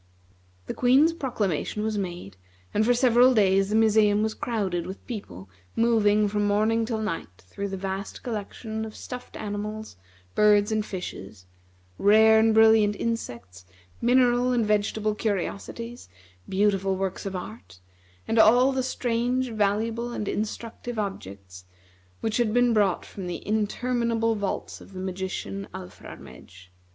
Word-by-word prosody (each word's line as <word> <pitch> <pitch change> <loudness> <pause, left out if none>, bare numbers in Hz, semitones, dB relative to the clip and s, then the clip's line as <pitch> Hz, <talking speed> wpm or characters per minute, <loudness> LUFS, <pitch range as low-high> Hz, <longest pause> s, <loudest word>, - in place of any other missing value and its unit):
The - - -4
Queen's 270 +6 +4
proclamation 210 - -2
was 220 0 -1
made, 175 - -5 0.4
and 215 - +2
for 245 +3 +4
several 250 0 +5
days 195 -2 +3
the 215 - 0
museum 215 -1 +4
was 220 0 -1
crowded 190 -9 -2
with 190 +2 -9
people 200 - -7 0.3
moving 215 -2 +3
from 205 0 0
morning 220 +2 +2
till 225 -2 -2
night 165 - -3 0.2
through 200 - -5
the 195 -1 -5
vast 195 +1 -5
collection 220 0 -5
of 220 -1 -7
stuffed 250 -1 -8
animals, 210 - -5 0.4
birds, 210 0 +4
and 215 -1 +1
fishes; 180 - -8 0.5
rare 220 +2 +6
and 220 0 +3
brilliant 220 -2 +5
insects; 120 - -5 0.4
mineral 245 0 +3
and 235 -3 +2
vegetable 210 0 0
curiosities; 215 - -4 0.4
beautiful 195 -1 +1
works 190 +1 -3
of 190 - -5
art; 105 - -9 0.5
and 225 - +1
all 245 +5 +6
the 265 -1 0
strange, 250 0 -1
valuable, 225 +3 -1
and 210 - -4
instructive 225 +3 -4
objects 95 - -6 0.6
which 220 - -1
had 235 -2 +1
been 245 -1 +4
brought 205 -4 +1
from 190 -3 -8
the 175 - -6
interminable 230 +2 0
vaults 205 -3 -4
of 195 - -14
the 185 - -7
magician 190 +1 -4
Alfrarmedj. 90 - -12
210 Hz, 140 wpm, -26 LUFS, 195-230 Hz, 0.6 s, rare